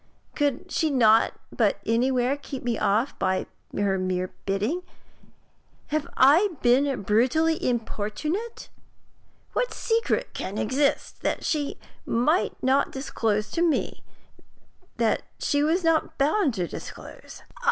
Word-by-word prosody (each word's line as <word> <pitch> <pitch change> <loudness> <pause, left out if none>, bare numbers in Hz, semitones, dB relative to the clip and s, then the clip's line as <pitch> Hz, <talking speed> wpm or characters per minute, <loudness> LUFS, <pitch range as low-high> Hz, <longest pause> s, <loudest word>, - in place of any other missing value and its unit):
Could 290 +5 -1
she 320 - +1
not 225 -5 +4 0.5
anywhere 250 +3 +2
keep 280 -2 -8
me 240 -1 0
off 220 +6 0
by 185 0 0 0.3
her 195 -1 +1
mere 185 0 -2
bidding? 210 - 0 1.1
Have 305 -1 -1
I 330 +8 +5
been 260 0 +3
brutally 260 +11 +2
importunate? 250 - -3 0.8
What - - -1
secret 460 0 0
can 200 - -5
exist 275 +7 0
that - - -2
she 295 -3 -1 0.3
might 300 +10 +1
not 265 +2 +2
disclose 220 -6 -1
to 335 - -1
me 335 -3 0 1.0
that 230 -2 +2 0.2
she 285 - +1
was 325 +5 +2
not 325 -1 +1
bound 290 - +2
to 180 -3 -1
disclose? - - -10
265 Hz, 115 wpm, -25 LUFS, 220-310 Hz, 1.1 s, I